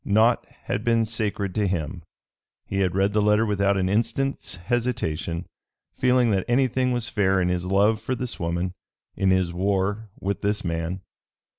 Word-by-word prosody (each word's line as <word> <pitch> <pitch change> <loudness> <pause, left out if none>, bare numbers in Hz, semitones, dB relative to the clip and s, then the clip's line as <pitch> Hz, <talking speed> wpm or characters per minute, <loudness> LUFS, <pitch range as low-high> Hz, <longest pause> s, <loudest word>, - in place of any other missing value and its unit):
Naught 110 +4 +3 0.2
had 105 - -2
been 115 -1 +3
sacred 105 -3 -2
to 105 0 +1
him. 85 -1 -2 0.6
He 100 - -2
had 90 -2 +1
read 100 +1 +2
the 105 - +3
letter 105 +2 +3
without 100 -1 +2
an 95 -1 +1
instant's 115 +7 -1
hesitation, 85 -5 -2 0.5
feeling 125 -2 +3
that 95 -2 +1
anything 130 0 +2
was 120 -2 -1
fair 95 -2 +2
in 90 -1 +1
his 90 0 -1
love 105 +3 +3
for 130 - -2
this 125 0 -5
woman, 85 +2 -1 0.4
in 95 - +1
his 95 -2 +2
war 100 +3 0
with 100 +1 -2
this 105 -1 0
man. 85 +2 -2
100 Hz, 165 wpm, -25 LUFS, 95-115 Hz, 0.6 s, Naught